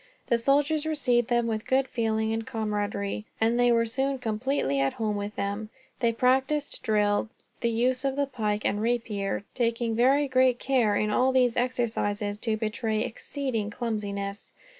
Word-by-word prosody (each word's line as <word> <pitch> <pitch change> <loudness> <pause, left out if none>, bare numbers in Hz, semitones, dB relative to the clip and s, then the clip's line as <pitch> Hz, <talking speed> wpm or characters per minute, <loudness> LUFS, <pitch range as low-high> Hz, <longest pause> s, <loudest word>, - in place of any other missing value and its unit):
The 235 - +3
soldiers 290 +5 +2
received 250 -7 +1
them 240 -1 +2
with 220 -1 -3
good 265 0 +2
feeling 220 -3 0
and 225 0 -2
camaraderie, 210 -1 -2
and 230 +2 +2
they 245 0 +5
were 230 0 +3
soon 270 +4 -1
completely 220 - -1
at 135 0 +1
home 215 -2 -1
with 205 +1 -4
them. 200 +2 -3 0.3
They 235 -2 +2
practiced 265 +5 +1
drill, 210 0 +1 0.3
the 235 - +1
use 250 +3 +1
of 270 -1 0
the 285 0 +1
pike 215 -6 -2
and 205 - 0
rapier; 215 -4 -1
taking 235 -1 0
very 270 +5 +4
great 255 -1 +3
care, 245 -6 +2
in 210 +1 +1
all 255 +4 +3
these 250 -2 +3
exercises, 220 -4 -1
to 220 -1 -1
betray 220 0 -1
exceeding 250 -2 -3
clumsiness. 205 -3 -4
230 Hz, 160 wpm, -27 LUFS, 210-255 Hz, 0.3 s, they